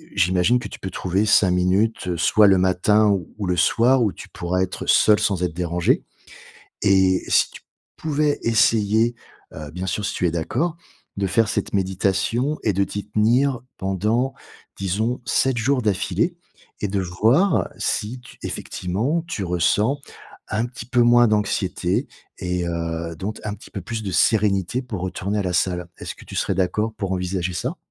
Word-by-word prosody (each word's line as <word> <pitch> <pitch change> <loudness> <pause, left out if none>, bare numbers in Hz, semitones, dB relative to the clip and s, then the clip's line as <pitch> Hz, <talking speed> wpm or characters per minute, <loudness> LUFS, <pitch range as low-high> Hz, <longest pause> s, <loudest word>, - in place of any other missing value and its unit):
j'imagine 95 +5 +3
que - - -6
tu - - -9
peux 95 - -5
trouver 95 +4 0
5 100 -2 +4
minutes 90 +1 +1
soit 105 +5 +4
le 95 - +5
matin 100 +4 +3
ou 95 -4 0
ou 100 - -2
le 90 - 0
soir 120 +8 +4
où 105 - +1
tu - - -11
pourrais 90 +1 -2
être 95 - -5
seule 105 -1 +5
sans 100 -4 0
être 90 -2 -1
dérangée 85 -1 +1 0.8
et 95 -2 +3
si - - +3
tu - - -12 0.4
pouvais 150 -1 0
essayer, 115 0 +3 0.4
heu, 75 -1 -8
bien 90 +2 -5
sûr 105 +4 -2
si 100 - -2
tu 90 - +1
es - - -1
d'accord, 125 - -1 0.4
de 100 - 0
faire 110 +4 +2
cette - - -2
méditation 100 - 0
et 105 - +2
de 100 - +2
t'y 100 +1 -5
tenir 120 +5 +2 0.2
pendant, 105 +7 0 0.4
disons 110 +6 -1
7 130 -1 +1
jours 125 +3 +1
d'affilée 105 - 0 0.5
et 105 - 0
de 100 0 -1
voir 110 - +2
si 115 +5 -2
tu 125 - -15
effectivement 120 - -2
tu 110 - -3
ressens 95 - +1 0.5
un 110 +3 0
petit 120 -2 -9
peu 125 -1 +1
moins 120 0 +6
d'anxiété 95 -4 0 0.3
et 90 -1 -2
heu, 85 0 -3
donc 105 +6 -5
un 105 - -2
petit - - -15
peu 100 - -5
plus 110 +5 -5
de 95 - -3
sérénité 100 +3 +2
pour 105 -7 -5
retourner 95 +3 -2
à - - -1
la 90 -1 -2
salle. 90 -1 0
Est-ce - - -6
que - - -14
tu - - -9
serais - - 0
d'accord 100 +4 0
pour 100 -3 -3
envisager 90 0 -2
ça? 90 - -3
100 Hz, 175 wpm, -22 LUFS, 90-115 Hz, 0.8 s, moins